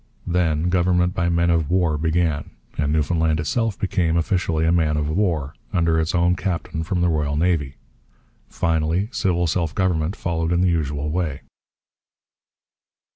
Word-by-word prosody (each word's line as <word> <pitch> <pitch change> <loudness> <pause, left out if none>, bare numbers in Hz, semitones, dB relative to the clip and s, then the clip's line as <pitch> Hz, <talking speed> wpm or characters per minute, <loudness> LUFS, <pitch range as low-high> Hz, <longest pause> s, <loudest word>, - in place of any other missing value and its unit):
Then 85 -2 +1
government 90 0 +2
by 85 -2 0
men 85 0 +2
of 80 -3 +1
war 90 -4 +2
began, 80 -1 0 0.3
and 75 -1 0
Newfoundland 80 +1 +1
itself 110 +7 -1
became, 90 -4 0
officially, 85 -2 0
a 80 - +3
man 80 -3 +2
of 75 -1 -1
war, 80 -4 0 0.2
under 85 -2 +2
its 80 +2 -1
own 85 +1 +3
captain 85 -4 -3
from 85 +2 -2
the 90 - +3
Royal 75 -3 0
Navy. 80 -5 0 0.7
Finally, 80 +5 0
civil 90 -6 0
self 80 -2 -1
government 90 -2 0
followed 85 -1 -2
in 90 0 +2
the 90 - +3
usual 75 -2 -1
way. 80 -4 -2
85 Hz, 150 wpm, -22 LUFS, 80-90 Hz, 0.7 s, a